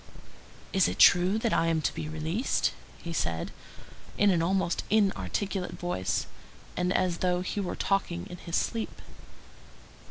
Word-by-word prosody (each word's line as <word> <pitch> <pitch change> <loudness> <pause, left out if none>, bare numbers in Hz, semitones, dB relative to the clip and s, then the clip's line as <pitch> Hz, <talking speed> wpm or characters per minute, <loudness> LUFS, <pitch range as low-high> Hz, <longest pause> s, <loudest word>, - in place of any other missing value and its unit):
"Is - - +4
it 90 +2 -3
true 180 - +6
that 225 0 0
I 165 - +2
am 165 -1 +2
to - - 0
be 155 - -5
released?" 160 - 0 0.3
he 170 - -5
said, 85 - -2 0.7
in 205 -1 +5
an 170 -3 +2
almost 180 0 0
inarticulate 200 -2 0
voice, 100 - -2 0.5
and 180 0 0
as 180 -2 +1
though 180 -1 +1
he 185 +3 -3
were 190 -3 -2
talking 195 -3 -1
in 180 - -9
his 170 -1 -5
sleep. 225 -1 -2
180 Hz, 150 wpm, -28 LUFS, 165-195 Hz, 0.7 s, true